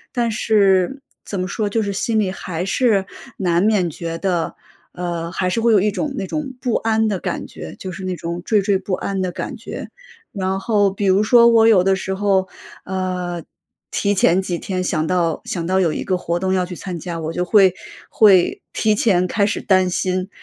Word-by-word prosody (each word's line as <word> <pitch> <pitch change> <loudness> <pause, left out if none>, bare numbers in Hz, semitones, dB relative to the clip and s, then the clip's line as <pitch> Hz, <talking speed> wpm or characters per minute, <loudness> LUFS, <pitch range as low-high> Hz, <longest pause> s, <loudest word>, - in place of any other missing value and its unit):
“但 235 -2 +1
是 205 +3 +2 0.2
怎 200 - -4
么 185 - -2
说， 210 +1 -2
就 225 +2 0
是， 200 -1 -2
心 220 +2 0
里 195 -3 0
还 180 -2 -5
是 200 -2 +2 0.3
难 175 -2 +1
免 205 -5 +2
觉 165 +1 -5
得， 175 -4 -1 0.4
呃 170 -1 -4
还 185 0 -1
是 230 +5 -1
会 235 - +3
有 210 - +5
一 210 +2 +1
种 280 +7 -3
那 195 - -2
种 290 0 -4
不 250 -2 -1
安 220 0 +1
的 200 -3 -1
感 - - -4
觉， 80 +5 -9
就 185 - -6
是 190 +2 -8
那 185 - -2
种 170 0 -5
惴 215 - +2
惴 195 -1 +1
不 190 - -4
安 195 +1 -2
的 185 -1 -1
感 - - -5
觉。 - - -8 0.4
然 190 -1 -2
后 205 -1 +2
比 200 +1 -3
如 190 +1 +4
说 235 +2 +6
我 230 -1 +5
有 195 -5 +5
的 195 0 +3
时 190 0 -3
候， 190 -2 +1 0.4
呃， 180 -2 -3 0.5
提 200 - +1
前 190 -1 +3
几 180 -2 -3
天 185 +1 -3
想 160 -3 0
到 170 -2 0
想 170 -3 -3
到 185 +2 +1
有 170 -5 +2
一 - - -3
个 185 -1 0
活 170 -1 -2
动 190 +1 0
要 185 -1 +1
去 180 0 -8
参 180 0 -6
加， 170 0 -5
我 160 0 -3
就 180 +1 -2
会 190 -1 +5 0.3
会 195 -5 +4
提 215 -1 +2
前 190 -4 +2
开 200 +2 +1
始 210 - -2
担 185 -2 +3
心。 185 +1 -1
190 Hz, 230 characters per minute, -20 LUFS, 180-210 Hz, 0.5 s, 说